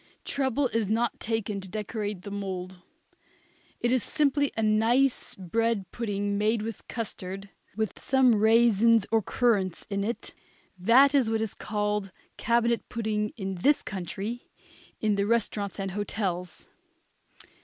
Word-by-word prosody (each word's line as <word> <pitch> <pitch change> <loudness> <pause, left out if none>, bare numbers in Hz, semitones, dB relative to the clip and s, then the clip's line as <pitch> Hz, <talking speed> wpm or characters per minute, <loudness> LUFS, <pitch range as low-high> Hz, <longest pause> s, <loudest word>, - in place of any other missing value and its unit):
Trouble 270 0 0
is 225 -4 -1
not 230 +2 0
taken 215 -3 -2
to 190 - -10
decorate 210 -1 -4
the 200 - -7
mould. 185 -2 -5 1.0
It 240 - +1
is 255 -1 +3
simply 285 0 +1
a 225 - +1
nice 230 +5 +2
bread 200 +1 -1
pudding 205 -3 -2
made 215 +1 +1
with 225 -2 -6
custard, 195 -3 -5 0.3
with 220 -1 -2
some 265 -2 +4
raisins 225 0 +5
or 225 -1 +4
currants 200 -5 0
in 200 0 0
it. 230 +4 -4 0.4
That 240 +9 +5
is 265 -6 +3
what 225 0 +1
is 220 -2 -2
called 210 -2 -2 0.2
cabinet 235 0 +1
pudding 215 -2 -1
in 190 -3 -4
this 290 +6 +3
country 195 +5 -5 0.5
in 215 -2 +1
the 200 0 +1
restaurants 210 -3 -1
and 195 -1 -2
hotels. 185 -3 -3
215 Hz, 135 wpm, -27 LUFS, 200-235 Hz, 1.0 s, raisins